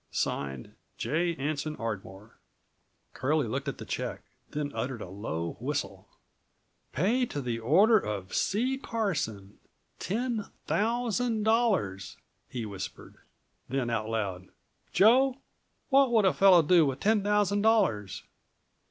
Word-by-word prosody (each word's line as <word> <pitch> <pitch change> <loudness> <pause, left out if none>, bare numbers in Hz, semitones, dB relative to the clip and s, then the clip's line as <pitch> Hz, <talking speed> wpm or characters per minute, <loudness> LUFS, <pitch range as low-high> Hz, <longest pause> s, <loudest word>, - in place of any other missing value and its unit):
"(Signed) 70 -2 -3 0.2
J. 170 +2 0
Anson 150 +2 -3
Ardmore." 105 -2 -7 0.7
Curlie 140 +1 0
looked 135 +5 -3
at 140 - -3
the - - -8
check, - - -4 0.3
then 145 -1 -3
uttered 130 -2 -3
a - - -8
low 85 -4 -4
whistle.235 - - -4 0.8
"Pay 225 - +1
to 145 - -4
the 120 -4 -3
order 195 - +5
of 100 - -5
C. 255 +6 0
Carson, 150 - -3 0.4
$10,000.00," 220 - 0 0.3
he 120 -3 -4
whispered. 100 -3 -8 0.5
Then 130 -2 -1
out 110 -1 -2
loud: 95 -5 -3 0.4
"Joe, 255 +5 +5 0.5
what 275 -2 +5
would 220 -4 +4
a 190 - +4
fellow 185 -4 +6
do 170 +2 +5
with 135 -1 -3
ten 215 0 +2
thousand 205 0 +2
dollars?" 115 - +1
155 Hz, 115 wpm, -29 LUFS, -, 0.8 s, fellow